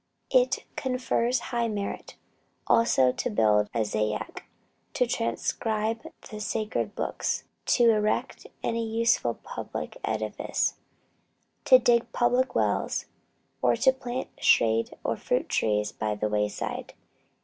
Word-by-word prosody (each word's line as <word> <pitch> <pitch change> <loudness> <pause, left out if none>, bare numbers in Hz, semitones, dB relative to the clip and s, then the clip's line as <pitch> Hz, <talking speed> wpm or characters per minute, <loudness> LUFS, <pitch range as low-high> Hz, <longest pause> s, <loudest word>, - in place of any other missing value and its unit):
It - - +3
confers 255 -1 0 0.2
high 235 -1 +1
merit, 205 -2 -4 0.5
also, 130 - +4
to 250 - -3
build 105 - +3
a 115 -2 0
zayat, 105 0 -2 0.5
to 250 - +2
transcribe 225 +2 -2 0.2
the 215 -3 -8
sacred 215 0 -2
books, - - -2 0.2
to 240 -2 +4
erect 215 -1 -1 0.2
any 230 0 0
useful 225 +1 +1
public - - -6
edifice, - - -1 0.9
to 255 - +9
dig 235 -1 +2
public 250 +1 +2
wells, - - 0 0.6
or - - +3
to 265 - +4
plant 255 -1 -5
shade 115 0 +3
or - - -1
fruit - - -1
trees 105 -1 +1
by 105 -1 -2
the 105 +1 -1
wayside. 105 -1 -2
225 Hz, 115 wpm, -27 LUFS, -, 0.9 s, to